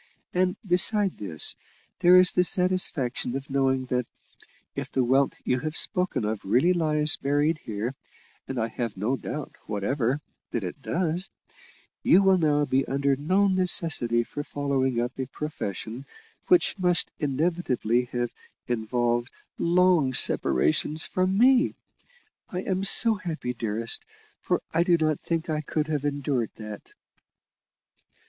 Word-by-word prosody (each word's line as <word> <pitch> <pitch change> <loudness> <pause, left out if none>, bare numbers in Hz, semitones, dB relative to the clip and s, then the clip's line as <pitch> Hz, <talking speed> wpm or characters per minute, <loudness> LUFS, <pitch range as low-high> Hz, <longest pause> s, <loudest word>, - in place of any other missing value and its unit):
And, 180 0 +1
beside 190 +2 +4
this, 85 -7 -1 0.5
there 180 0 +6
is 185 0 +6
the 180 - +2
satisfaction 180 -10 +1
of 135 +1 -6
knowing 135 -1 +1
that, 125 -1 -1 0.7
if - - -5
the 130 - +1
wealth 135 +3 +2
you 125 - 0
have 155 +3 -2
spoken 180 - 0
of 110 -1 -3
really 130 - +2
lies 155 -3 +2
buried 145 +3 0
here, 110 +2 -5 0.5
and 135 - -5
I 115 -1 0
have 115 -2 -5
no 110 +8 -1
doubt 150 +2 -6 0.2
whatever 120 +6 -1 0.3
that 115 - -3
it 90 +9 -7
does, 175 +4 -2 0.7
you 195 - +4
will 190 -1 +4
now 150 -2 +2
be 135 -1 +1
under 140 +1 0
no 185 +9 +1
necessity 165 - +2
for 145 +5 -7
following 135 -4 -1
up 120 +1 -2
a 130 - -3
profession 130 - -6 0.4
which 355 - +2
must 180 -1 +1
inevitably 140 -5 -1
have 120 -1 -3 0.4
involved 120 +1 -1 0.3
long 170 -6 +2
separations 150 - +2
from 185 +1 -1
me. 255 +4 +4 0.7
I 180 +1 -4
am 190 0 -2
so 225 +3 +8
happy, 165 -10 -5
dearest, 115 0 -2 0.4
for - - -1
I 165 - +2
do 175 -1 +3
not 155 -2 0
think 165 -1 -3
I 155 -2 -2
could 150 0 -2
have 145 -2 -2
endured 140 -5 -2
that." 105 -2 -8
145 Hz, 140 wpm, -25 LUFS, 120-175 Hz, 0.7 s, so